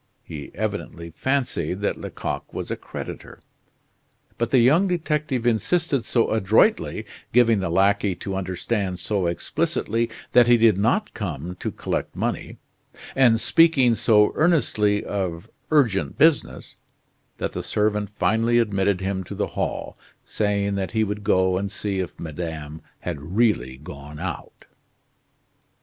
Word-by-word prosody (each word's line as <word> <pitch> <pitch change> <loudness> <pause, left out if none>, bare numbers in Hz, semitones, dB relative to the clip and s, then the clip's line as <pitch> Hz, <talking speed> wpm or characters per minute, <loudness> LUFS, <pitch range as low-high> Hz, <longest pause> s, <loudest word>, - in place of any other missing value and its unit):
He 75 -3 -8
evidently 85 0 -4
fancied 110 - -1
that 100 - 0
Lecoq - - -5
was - - -5
a - - 0
creditor. - - -8 1.0
But 115 0 0
the 130 - +3
young 150 +11 +5
detective 150 -8 -1
insisted 135 +3 +1
so 115 -2 +1
adroitly, 110 -1 +2 0.3
giving 115 -3 +4
the 95 - -2
lackey 100 +2 +2
to 95 +2 -5
understand 95 +1 -2
so 95 -1 0
explicitly 115 +6 -1 0.2
that 120 -1 +6
he 120 0 +6
did 115 -3 +5
not 160 - +1
come 90 - -5
to - - -2
collect - - -4
money, - - -3 0.6
and 120 -4 +5
speaking 150 -7 +4
so 110 -2 +4
earnestly 110 -11 +2
of 90 -4 -3 0.2
urgent 125 -11 +2
business, 155 +1 +2 0.6
that - - -3
the - - -3
servant 105 -1 0
finally 115 +2 +2
admitted 100 -4 +1
him 95 0 -2
to - - -7
the - - -2
hall, - - -3 0.3
saying 100 -1 0
that 95 -1 -3
he 110 -1 +2
would 105 0 -3
go 95 -1 +2
and 100 0 -3
see 100 -1 -3
if 90 - -5
madame 80 -1 -6 0.2
had 70 - -4 0.2
really 65 - +2
gone 75 +1 -10
out. - - -6
105 Hz, 135 wpm, -23 LUFS, 95-120 Hz, 1.0 s, that